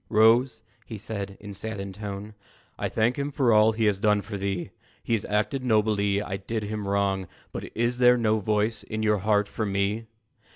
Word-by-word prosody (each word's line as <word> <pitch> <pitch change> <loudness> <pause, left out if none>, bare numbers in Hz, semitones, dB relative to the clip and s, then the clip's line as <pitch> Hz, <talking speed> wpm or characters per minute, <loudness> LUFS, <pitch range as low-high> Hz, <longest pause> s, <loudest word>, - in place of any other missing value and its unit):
"Rose," 115 +2 +4 0.2
he 110 - -7
said, 100 -2 -5
in 105 0 -9
a - - -7
saddened 100 -1 -5
tone, 105 +1 -6 0.4
"I - - -2
thank 120 +4 +1
him 140 +1 -2
for 130 -4 +3
all 110 +1 +6
he 110 0 0
has 100 -2 +2
done 105 -1 +2
for 105 0 -6
thee; 95 -2 -3 0.3
He - - -1
has 110 - 0
acted 110 +6 0
nobly 105 -4 +2
I 95 -1 -4
did 110 +3 -4
him 105 -1 -4
wrong 100 -2 0 0.2
But - - -6
is 120 +2 0
there 125 0 +6
no 110 -2 +2
voice 105 +1 0
in 110 0 -4
your 105 -1 +2
heart 105 +1 +2
for 110 - -4
me?" 100 +2 -1
105 Hz, 200 wpm, -26 LUFS, 100-110 Hz, 0.4 s, all